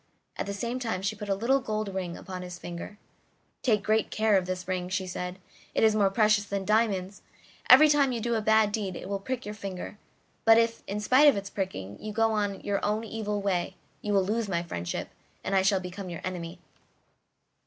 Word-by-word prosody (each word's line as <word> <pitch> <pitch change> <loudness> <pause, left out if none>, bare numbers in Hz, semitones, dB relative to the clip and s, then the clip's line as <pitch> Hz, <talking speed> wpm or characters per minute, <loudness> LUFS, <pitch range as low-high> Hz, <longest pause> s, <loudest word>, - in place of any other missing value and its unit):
At - - -3
the 200 - -3
same 235 +5 -3
time 225 -7 -2
she 200 +2 -1
put 210 -1 -7
a 195 - +2
little 245 +7 +2
gold 215 -5 -3
ring 180 -3 -4
upon 185 -1 -7
his 180 -1 -7
finger. 175 +4 -7 0.6
"Take 215 -5 +2
great 215 0 +2
care 215 -1 +2
of 185 -2 +2
this 185 0 -4
ring," 180 -1 -2
she 190 0 -1
said: 180 0 -5 0.4
"it - - +2
is 220 -1 +6
more 200 -2 +4
precious 215 0 +3
than 200 -1 -3
diamonds; 205 -3 +1 0.5
every 310 - +10
time 285 -3 +3
you 240 - -2
do 235 +1 -1
a 225 - +1
bad 220 0 +4
deed 200 -4 -2
it - - -7
will 200 0 -2
prick 255 +5 -4
your 210 - -5
finger, 200 0 -7 0.4
but 225 0 +7
if, 230 0 +2
in 205 +1 -3
spite 260 +7 +5
of 285 - +6
its 195 0 -5
pricking, 105 - -5
you 215 - -5
go 225 +1 +2
on 205 -2 0
in - - -13
your 200 -1 -1
own 215 +2 0
evil 210 -2 -3
way, 185 -1 -1 0.3
you 210 - -2
will 195 -2 +3
lose 215 +1 -1
my 170 -2 0
friendship, 85 - -4 0.3
and 195 - -1
I 190 - +5
shall 195 0 +3
become 185 +1 -7
your 170 - -6
enemy." 175 -2 -5
205 Hz, 220 wpm, -28 LUFS, 185-220 Hz, 0.6 s, every